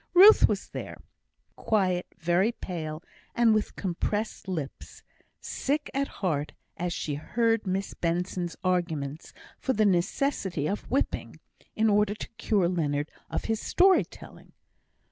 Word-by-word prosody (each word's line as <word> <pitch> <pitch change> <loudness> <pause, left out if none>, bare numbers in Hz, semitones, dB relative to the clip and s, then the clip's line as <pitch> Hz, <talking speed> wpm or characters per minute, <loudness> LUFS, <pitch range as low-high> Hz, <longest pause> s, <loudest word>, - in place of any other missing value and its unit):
Ruth 400 +5 +9
was - - -2
there, - - -6 0.6
quiet, 185 -5 +1
very 175 +5 +2
pale, 160 -7 -6 0.3
and 235 -2 +5
with 215 -1 0
compressed 205 +4 -2
lips, 160 -7 -6 0.4
sick 290 +2 -2
at 275 +1 0 0.2
heart 150 -4 -1 0.2
as 175 +1 -2
she 155 -2 -3
heard 225 +8 0
Miss 190 +1 -1
Benson's 175 0 -2
arguments 165 -5 -1 0.3
for 265 - 0
the 215 -1 +3
necessity 190 - 0
of 205 - -3
whipping, 270 - -1 0.4
in 220 +1 +3
order 210 0 +3
to - - -7
cure 205 -6 +2
Leonard 150 -4 -1 0.2
of - - -3
his 225 -1 -1
story 375 +1 +5
telling. - - -14
185 Hz, 130 wpm, -28 LUFS, 170-220 Hz, 0.6 s, Ruth